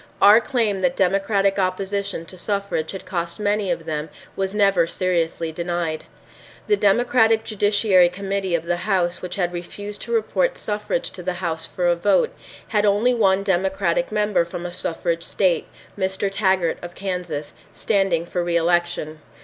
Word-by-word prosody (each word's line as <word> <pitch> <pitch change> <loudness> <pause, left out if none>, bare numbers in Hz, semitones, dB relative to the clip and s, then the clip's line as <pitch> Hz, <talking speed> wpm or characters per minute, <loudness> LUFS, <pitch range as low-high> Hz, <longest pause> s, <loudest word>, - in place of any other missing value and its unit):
Our 210 +3 +7
claim 225 -6 0
that 265 +5 +1
Democratic 195 +1 +2
opposition 195 -1 -2
to 185 - -10
suffrage 200 -4 -2
had 190 - -6
cost 170 -1 -3
many 205 -1 0
of 170 -2 -2
them 155 -1 -3 0.3
was 195 +1 -2
never 195 -5 +3
seriously 170 -2 -1
denied. 170 -1 -3 0.6
The 415 - +3
Democratic 225 - +3
Judiciary 205 -4 +3
Committee 195 0 -2
of 165 - -1
the 175 0 0
House 180 -2 0
which 180 -1 -4
had 180 -2 -1
refused 205 +4 -7
to - - -6
report - - +1
suffrage 210 -4 -2
to 185 - -9
the 180 +1 -2
House 170 -3 -3
for 180 - -3
a 175 0 +4
vote, 205 - +2 0.4
had 210 -2 +2
only 210 +5 +3
one 195 -4 +3
Democratic 190 -2 0
member 210 -4 +2
from 170 +1 -7
a 175 - -4
suffrage 170 -1 -2
state, 180 -3 0 0.3
Mr. 190 0 -1
Taggart 190 -4 +1
of 175 0 -8
Kansas, 180 -6 -4 0.2
standing 195 -6 0
for 175 0 -2
reelection. 170 -2 0
190 Hz, 155 wpm, -22 LUFS, 175-205 Hz, 0.6 s, Our